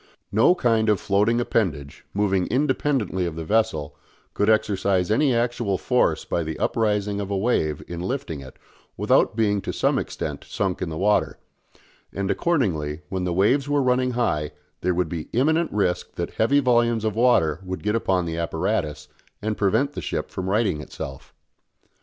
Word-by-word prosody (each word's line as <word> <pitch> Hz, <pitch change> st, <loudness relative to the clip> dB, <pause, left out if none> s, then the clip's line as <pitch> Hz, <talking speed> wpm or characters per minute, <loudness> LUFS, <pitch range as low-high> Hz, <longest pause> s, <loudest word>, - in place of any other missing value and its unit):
No 115 Hz, -, +5 dB
kind 115 Hz, -9 st, +2 dB
of 105 Hz, -3 st, +3 dB
floating 105 Hz, +4 st, +2 dB
appendage, 85 Hz, -13 st, -2 dB
moving 95 Hz, -2 st, +1 dB
independently 130 Hz, -, 0 dB
of 80 Hz, -, -5 dB
the 80 Hz, -1 st, -5 dB
vessel, 80 Hz, -8 st, 0 dB, 0.4 s
could 105 Hz, -, +1 dB
exercise 100 Hz, -3 st, +2 dB
any 135 Hz, +5 st, +3 dB
actual 120 Hz, -4 st, 0 dB
force -, -, +1 dB
by 85 Hz, -, -1 dB
the 80 Hz, -1 st, -4 dB
uprising 105 Hz, -2 st, 0 dB
of 100 Hz, -, -5 dB
a 100 Hz, -, -1 dB
wave 85 Hz, -9 st, 0 dB
in 85 Hz, -1 st, -6 dB
lifting 90 Hz, -, -3 dB
it 65 Hz, -2 st, -12 dB, 0.4 s
without -, -, +3 dB
being 105 Hz, -3 st, +1 dB
to -, -, -4 dB
some -, -, +1 dB
extent -, -, -5 dB
sunk 95 Hz, -3 st, -2 dB
in 90 Hz, -, -2 dB
the 80 Hz, -, -5 dB
water; 105 Hz, +3 st, +1 dB, 0.7 s
and, 100 Hz, 0 st, -2 dB
accordingly, 85 Hz, -, 0 dB
when 95 Hz, -1 st, -2 dB
the 90 Hz, -, -1 dB
waves 130 Hz, +10 st, +2 dB
were 145 Hz, -1 st, +2 dB
running 125 Hz, 0 st, +2 dB
high 75 Hz, -12 st, 0 dB, 0.3 s
there 90 Hz, 0 st, +1 dB
would 90 Hz, -1 st, +1 dB
be 80 Hz, -1 st, -5 dB
imminent 160 Hz, +7 st, +2 dB
risk 95 Hz, -4 st, -1 dB
that -, -, -3 dB
heavy 135 Hz, +6 st, +2 dB
volumes 120 Hz, -4 st, +2 dB
of 110 Hz, -1 st, -1 dB
water 100 Hz, -10 st, +3 dB
would 95 Hz, 0 st, -5 dB
get 105 Hz, 0 st, 0 dB
upon 95 Hz, -5 st, +1 dB
the 80 Hz, 0 st, -3 dB
apparatus 80 Hz, -3 st, -2 dB, 0.3 s
and 110 Hz, 0 st, -2 dB
prevent 110 Hz, +9 st, +1 dB
the -, -, -5 dB
ship -, -, -3 dB
from 95 Hz, 0 st, -4 dB
righting 100 Hz, -7 st, +1 dB
itself. 65 Hz, -3 st, -8 dB
100 Hz, 170 wpm, -24 LUFS, 90-120 Hz, 0.7 s, No